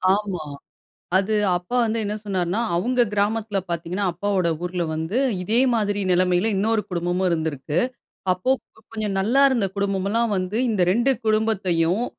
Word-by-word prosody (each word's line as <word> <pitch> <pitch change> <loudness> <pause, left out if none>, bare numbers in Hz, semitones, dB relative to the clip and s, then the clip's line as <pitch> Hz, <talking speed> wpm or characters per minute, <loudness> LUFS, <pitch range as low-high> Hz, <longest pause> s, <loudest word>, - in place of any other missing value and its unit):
ஆமா. 195 -6 -3 0.7
அது 200 +3 0 0.2
அப்பா 180 +7 -6
வந்து 225 0 0
என்ன 210 - -2
சொன்னாருன்னா, 190 +1 -1
அவங்க 245 +8 +1
கிராமத்துல 210 0 0
பாத்தீங்கனா 170 +4 -2
அப்பாவோட 185 0 0 0.2
ஊர்ல 180 0 -2
வந்து 160 +9 -2 0.3
இதே 220 +6 +2
மாதிரி 205 -2 0
நிலைமையில 180 +3 +2
இன்னொரு 220 +2 +1
குடும்பமும் 175 +1 0
இருந்திருக்கு. 160 -2 -1 0.5
அப்போ 185 +8 0 0.4
கொஞ்சம் 215 -3 -2
நல்லா 235 +8 +3
இருந்த 230 -7 +1
குடும்பம் 195 -1 -1
எல்லாம் 230 +1 +1
வந்து 185 +3 -2
இந்த 210 -5 0
2 240 +7 +3
குடும்பத்தையும் 200 -4 +1
200 Hz, 140 wpm, -23 LUFS, 180-220 Hz, 0.7 s, நல்லா